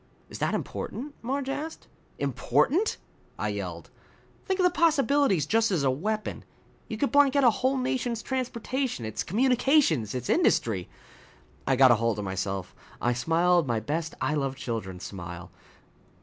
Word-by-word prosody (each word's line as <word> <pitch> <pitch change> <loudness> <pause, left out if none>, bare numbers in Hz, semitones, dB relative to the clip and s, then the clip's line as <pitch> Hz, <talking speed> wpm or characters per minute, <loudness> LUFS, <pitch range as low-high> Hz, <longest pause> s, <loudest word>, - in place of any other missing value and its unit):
"Is - - -7
that - - 0
important?" 285 +4 -5
Marge 265 +3 -2
asked. 295 +4 -5 0.3
"Important?" 375 +10 +1 0.4
I - - -1
yelled. - - -5 0.6
"Think 380 0 0
of - - +3
the 360 - +5
possibilities 280 - +3
just 225 +6 +2
as 175 -8 0
a 135 - +3
weapon! 215 +10 -3 0.4
You 220 - -5
could 280 - 0
blank 285 -1 +5
out 280 - +4
a 240 - +7
whole 260 +4 0
nation's 245 -3 -1
transportation, 255 - -2
its 110 - -3
communications, 245 - +2
its 125 -1 -4
industry 95 -6 +2 0.4
" - - -29
I 135 - +3
got 130 -1 +7
hold 115 -1 +2
of 105 - -3
myself. 95 0 -3 0.3
I 120 - +1
smiled 165 +5 +2
my 115 -2 +1
best 155 +8 -3
I 150 - 0
love 135 -3 -1
children 105 -8 -5
smile. 85 -2 -8
190 Hz, 155 wpm, -27 LUFS, -, 0.6 s, a